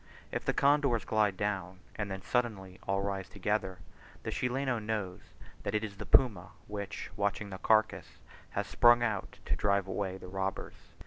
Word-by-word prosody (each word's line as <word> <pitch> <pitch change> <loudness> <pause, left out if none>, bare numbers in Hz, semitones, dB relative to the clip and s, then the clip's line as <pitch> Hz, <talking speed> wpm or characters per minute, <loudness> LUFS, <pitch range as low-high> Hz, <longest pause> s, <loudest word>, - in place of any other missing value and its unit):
If - - -2
the - - +3
condors 140 -6 +3
glide 105 -3 +2
down, 95 -2 -2 0.2
and 100 -2 -3
then 95 -1 -5
suddenly 105 -7 -1
all 95 0 +1
rise 100 -2 -3
together, 105 -3 -1 0.5
the - - -3
Chileno 125 0 0
knows 105 -4 -3 0.4
that 100 - -2
it 105 - +1
is 100 -3 -5
the - - -7
puma 100 -10 +4
which, 100 -1 -5
watching 100 0 -1
the 95 - -6
carcass, 110 0 +2 0.3
has - - -2
sprung 120 0 +6
out 110 -5 -2
to - - +1
drive 100 -1 +2
away 95 -1 -2
the 95 - -10
robbers. 95 +1 -3
100 Hz, 170 wpm, -32 LUFS, 95-110 Hz, 0.5 s, sprung